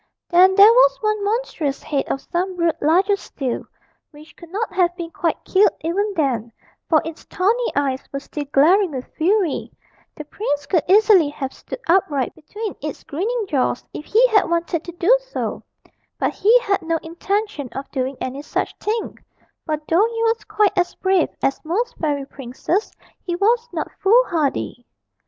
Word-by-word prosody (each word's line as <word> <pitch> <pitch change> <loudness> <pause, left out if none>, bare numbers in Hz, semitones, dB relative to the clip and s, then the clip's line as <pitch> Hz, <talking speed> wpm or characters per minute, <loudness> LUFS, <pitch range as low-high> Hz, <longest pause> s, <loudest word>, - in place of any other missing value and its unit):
Then 370 +2 +6
there 400 +1 +9
was - - +5
one 425 -1 0
monstrous 405 - -2
head 280 -2 -1
of 270 - -2
some 365 +2 -3
brute 340 -2 0
larger 370 +7 +3
still, 270 -10 -5 0.4
which 305 +1 -16
could 340 - -14
not 415 +3 -3
have 355 -2 +2
been 340 -2 -6
quite 330 -1 -2
killed 390 +2 +4
even 390 +6 -1
then, 245 - -1 0.4
for 315 -2 +4
its 325 -1 -7
tawny 460 +6 0
eyes 270 -2 0
were 275 - -3
still 290 +1 -6
glaring 340 +8 +4
with 260 -1 -5
fury 360 0 0 0.4
the 300 - -8
prince 290 -4 -3
could 340 +1 +2
easily 400 -5 +6
have 275 -2 -5
stood - - -8
upright 315 -7 +2
between 405 +7 -7
its 300 -1 -6
grinning 430 +9 -2
jaws 260 -6 0
if 300 - -7
he 460 +4 +4
had 425 -5 +3
wanted 335 -1 -1
to 345 - -6
do 355 +8 +4
so; - - -4 0.6
but - - 0
he 450 +5 +5
had 400 -5 0
no 330 0 -1
intention 345 - -3
of 270 +1 -7
doing 260 -1 -2
any 260 +2 -4
such 295 - -3
thing, 440 +2 -3 0.5
for 310 -1 0
though 370 +7 +4
he 460 0 -3
was 455 0 +1
quite 420 -2 +1
as 355 0 0
brave 380 -3 +2
as 270 - 0
most 445 +10 -2
fairy 290 -3 -1
princes 275 - -3 0.3
he 350 - -2
was 460 +5 +1
not - - -3
foolhardy. 360 - +1
345 Hz, 170 wpm, -21 LUFS, 295-420 Hz, 0.6 s, there